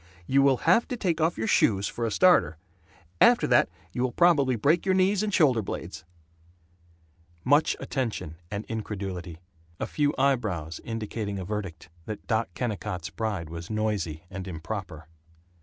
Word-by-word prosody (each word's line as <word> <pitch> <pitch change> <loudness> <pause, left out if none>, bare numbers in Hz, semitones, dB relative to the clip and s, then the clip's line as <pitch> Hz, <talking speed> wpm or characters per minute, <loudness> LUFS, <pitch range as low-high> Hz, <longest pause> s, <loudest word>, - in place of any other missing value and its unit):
You 135 +8 +3
will 135 -2 +4
have 185 +8 +4
to 250 - -4
take 170 -6 -1
off 165 +2 +1
your 110 - -1
shoes, 100 -2 +3
for 115 -1 -3
a - - -3
starter! 175 - +4 0.6
After - - +6
that - - +4 0.2
you 125 - -3
will 130 -1 +1
probably 145 -5 +4
break 150 +10 +2
your 190 -1 +2
knees 190 +1 +3
and 215 -1 -1
shoulder 140 - +4
blades." 95 - -6 1.4
Much 145 +4 +3
attention 105 - -3
and 100 +1 -4
incredulity. 95 -6 -5 0.4
A - - -1
few 145 -1 0
eyebrows 105 - 0
indicating 110 -2 -4
a 95 - -5
verdict 95 -5 -5 0.2
that 110 - -6
Doc 115 -2 0
Kennicott's 100 -5 -4
bride 100 -8 -3
was 85 0 -7
noisy 105 -7 -2
and 95 0 -6
improper. 85 -1 -6
110 Hz, 155 wpm, -27 LUFS, 95-140 Hz, 1.4 s, After